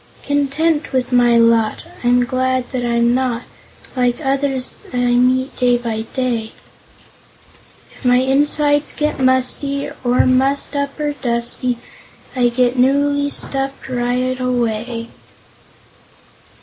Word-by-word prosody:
"Content 290 +2 0
with 255 -1 -1
my 240 -1 +4
lot, 230 -1 +2 0.2
I'm 245 0 +3
glad 255 0 -1
that 255 -2 -2
I'm 235 0 +2
not 250 -2 -1 0.5
Like 245 0 +1
others 270 -2 -1
I 250 - -4
meet 255 +2 +2
day 245 -1 +3
by 225 -2 -4
day; 240 -4 -2 1.4
If - - -18
my 250 -1 +4
insides 290 +3 +2
get 300 -1 -2
musty, 265 +2 0
Or 245 0 +3
mussed 270 +3 +2
up, 280 +1 -3
or 295 -1 -1
dusty, 245 -1 -2 0.6
I 245 -1 +3
get 245 +1 +1
newly 285 +2 +2
stuffed 270 -1 -1
right 250 +1 -1
away." 235 -2 -2
255 Hz, 115 wpm, -18 LUFS, 245-275 Hz, 1.4 s, my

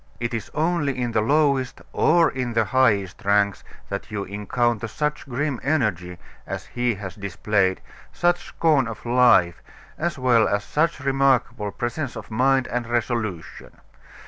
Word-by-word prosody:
It 120 +1 -3
is 115 -3 -4
only 155 -4 0
in 120 -1 -1
the 110 - +1
lowest 140 +1 +1
or 165 -1 +4
in 125 -2 -3
the 115 -1 +2
highest 105 -7 +1
ranks 100 -1 +2 0.3
that 100 0 -5
you 105 -2 -3
encounter 110 +3 -1
such 150 +5 -3
grim 135 0 -2
energy 105 - -1 0.3
as - - -5
he 120 -2 -1
has 95 -2 -7
displayed, 100 -1 0 0.3
such 175 0 +1
scorn 150 -7 +2
of 115 0 -8
life, 120 -8 +4 0.4
as 170 -1 -1
well 120 -4 +3
as 100 0 0
such 155 +2 0
remarkable 135 -5 +1
presence 120 +6 -4
of - - -9
mind 130 +3 +2
and 120 -1 -2
resolution. 115 -7 -3
120 Hz, 145 wpm, -23 LUFS, 105-135 Hz, 0.4 s, or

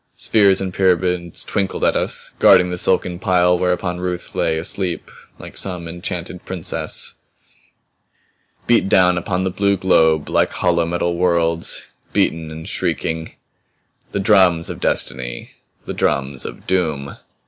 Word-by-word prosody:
Spheres 100 -3 +3
and 95 -1 -3
pyramids 90 -2 +1
twinkled 100 -1 -2
at - - +3
us, - - -2
guarding 90 0 +6
the 90 - -2
silken 90 -1 +2
pile 90 -2 +3
whereon 90 0 -1
Ruth 90 -1 -4
lay 80 -1 0
asleep 90 +2 -2 0.3
like - - -11
some 90 -3 -4
enchanted 85 +1 -6
princess. 90 -3 -2 1.5
Beat 115 -4 +3
down 90 -1 +4
upon 90 +1 -2
the 95 - -1
blue 100 +1 +1
globe 80 -5 +3
like - - +1
hollow 85 -2 +1
metal 85 0 -1
worlds, 85 -2 0 0.3
beaten 80 -1 0
and 80 +1 -8
shrieking. 80 0 -2 0.8
The - - -2
drums 95 -5 +3
of - - -8
Destiny! - - -1 0.3
The - - -4
drums 70 -1 -1
of - - -8
Doom! 80 -7 -1
90 Hz, 135 wpm, -19 LUFS, 80-95 Hz, 1.5 s, guarding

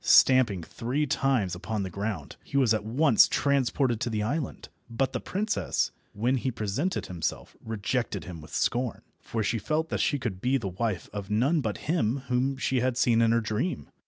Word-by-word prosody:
Stamping 120 -9 +5
three 130 - -2
times 130 -9 +1
upon 100 +3 -3
the 95 - -4
ground, 100 -6 -4
he 140 - -3
was 125 -5 +4
at 110 - 0
once 120 +3 +5
transported 130 -3 +1
to 120 - 0
the 105 -2 -1
island, 140 +4 -3 0.2
but 130 +3 -1
the - - -1
princess, 210 +3 -1 0.2
when 120 +6 +1
he 130 - -1
presented 120 - -2
himself, 85 -3 -4
rejected 110 -2 -2
him 85 -3 -8
with 75 - -12
scorn, 125 -2 -1 0.2
for 110 -1 -3
she 115 +3 0
felt 155 +8 -1
that - - -1
she 145 - +2
could 110 -8 -4
be 130 +3 +2
the 100 -7 -3
wife 100 0 -2
of 100 -1 -5
none 135 +10 +2
but 110 -5 -2
him 140 -5 0
whom 130 +2 +1
she 130 0 +1
had 125 0 0
seen 115 -2 +4
in 115 -1 +4
her 115 0 +3
dream. 110 - -2
115 Hz, 190 wpm, -28 LUFS, 105-135 Hz, 0.2 s, Stamping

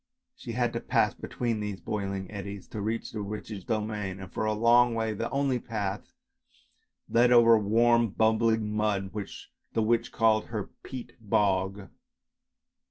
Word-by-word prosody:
She - - -7
had - - 0
to - - -1
pass - - +1
between 115 -3 -3
these 105 -2 -4
boiling 100 -2 -4
eddies 100 -1 -7
to 105 - -5
reach 110 +3 -3
the 110 - -4
witch's 105 -1 -6
domain, 105 -2 -3
and 95 -1 -10
for - - -1
a 110 - +1
long 120 +2 +4
way 110 -1 -1
the 115 +3 -3
only 135 -2 0
path 105 -4 -4 1.0
led 120 +1 +4
over 115 -1 +7
warm 115 +2 +3
bubbling 110 0 +1
mud, 100 -3 0
which 105 -2 -7 0.2
the 110 - +1
witch 115 +1 +1
called 110 -1 +3
her 110 -4 -5
" - - -53
peat 120 -2 -8
bog." 100 -2 0
110 Hz, 160 wpm, -28 LUFS, 100-115 Hz, 1.0 s, over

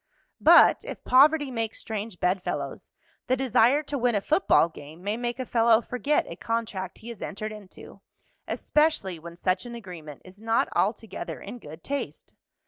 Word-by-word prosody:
But - - +7
if - - -8
poverty 290 +2 +5
makes 225 -2 -3
strange 215 -3 -5
bedfellows, 180 +1 -2 0.4
the 255 - +2
desire 255 +2 +3
to 285 -1 -4
win 245 -2 +2
a 205 - +1
football 310 - +3
game 160 +1 -13
may 205 +2 -1
make 240 0 -3
a 255 - -4
fellow 230 -1 +4
forget 250 +5 0
a 170 - -7
contract 215 -5 -3
he 230 - -11
has 235 - -9
entered 215 +2 -5
into, 210 -3 -12 0.5
especially 300 - 0
when 170 +1 -10
such 185 +5 -1
an 235 - -7
agreement 170 - -10
is 185 +3 -15
not 225 0 +1
altogether 215 +2 -2
in 245 - -9
good 160 -3 -12
taste. 285 0 -5
225 Hz, 165 wpm, -26 LUFS, 185-250 Hz, 0.5 s, But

